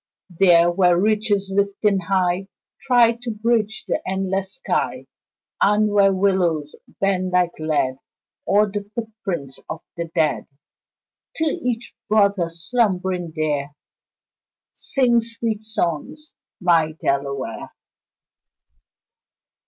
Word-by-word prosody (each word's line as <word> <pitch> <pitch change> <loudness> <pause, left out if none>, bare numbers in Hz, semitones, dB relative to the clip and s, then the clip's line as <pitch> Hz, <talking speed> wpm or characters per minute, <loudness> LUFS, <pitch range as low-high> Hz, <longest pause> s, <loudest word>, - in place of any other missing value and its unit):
There, 175 -2 +6
where 180 -1 +3
ridges 205 -1 +1
lifting 200 0 +1
high 185 0 0 0.4
Try 235 -2 +5
to 245 - -5
bridge 220 -1 0
the - - -1
endless 190 0 -2
sky, - - -2 0.6
And 210 +1 +3
where 200 -1 +5
willows 180 -6 +1 0.2
bend 185 -2 0
like 180 -1 +3
lead 150 -4 0 0.5
O'er 205 0 +3
the 205 0 -5
footprints 200 - -5
of 160 - -5
the 170 - -3
dead 160 -3 +1 0.9
To 320 - -1
each 245 -5 -2 0.2
brother 200 -5 +3
slumbering 180 -2 -1
there, 150 -2 -2 1.0
Sing 240 -3 +2
sweet 230 -2 -4
songs, 215 - -3 0.3
my 165 -4 +3
Delaware. 140 -5 -3
195 Hz, 100 wpm, -21 LUFS, 170-215 Hz, 1.0 s, There